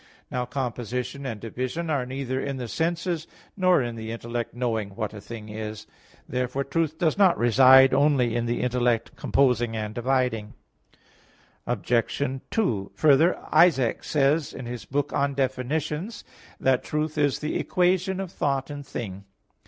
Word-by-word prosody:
Now 125 -1 -1
composition 125 +1 -3
and 115 -4 -4
division 130 +9 -3
are 135 -4 0
neither 130 0 -3
in 140 -1 -3
the 125 -2 -4
senses 170 - -1 0.3
nor 185 -7 +3
in 120 -1 -4
the 110 0 -6
intellect 115 +1 -4
knowing 110 -5 -2
"what 110 -1 -3
a 105 - -8
thing 110 -1 -8
is." 110 0 -6 0.4
Therefore 125 +2 -1
truth 155 +2 -1
does 165 +3 +1
not 190 -3 +5
reside 130 +2 +7
only 135 -4 +3
in 120 0 0
the 120 - -1
intellect 120 -2 0
composing 120 -4 +1
and 105 -1 -4
dividing. 120 -2 -1 1.1
Obj. 120 0 0 0.3
2: 110 - -1
Further, 155 +4 +4 0.2
Isaac 140 -9 +4
says 145 +1 +1
in 130 - -7
his 120 -4 -6
book 145 +5 -2
On 140 0 0
Definitions 150 - -2 0.4
that 130 -1 +2
truth 150 0 -2
is 145 -3 +2
the 150 - -2
equation 185 +1 +1
of 190 -3 -4
thought 135 -3 -1
and 145 0 -6
thing. 100 -7 -6
130 Hz, 150 wpm, -25 LUFS, 120-150 Hz, 1.1 s, reside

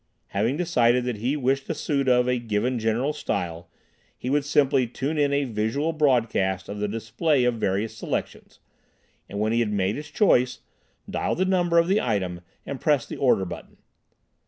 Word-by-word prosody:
Having 110 +8 0
decided 125 -8 +2
that 125 -3 -2
he 125 +8 -1
wished 135 0 0
a 165 - -1
suit 140 -3 0
of 125 0 +4
a 125 -1 +1
given 120 +2 -1
general 115 +6 0
style, 85 - -4 0.5
he 125 - -4
would 145 0 +2
simply 140 -3 +2
tune 140 +6 -3
in 145 -1 +2
a 140 0 +2
visual 125 +7 -1
broadcast 115 - +1
of 105 0 -6
the 105 - 0
display 115 +7 0
of 120 -2 +1
various 105 +3 -1
selections, 110 - -5 0.7
and 100 - -5
when 110 +1 +1
he 115 - +2
had 115 -3 0
made 100 0 0
his 150 0 -7
choice, 130 - +2 0.5
dial - - -1
the 185 - +1
number 175 -3 +2
of 170 0 +4
the 195 +3 +2
item 95 -6 -2 0.2
and 140 -2 -6
press 145 -5 +2
the - - -7
order 125 -8 +3
button. 90 - -9
125 Hz, 180 wpm, -25 LUFS, 110-145 Hz, 0.7 s, of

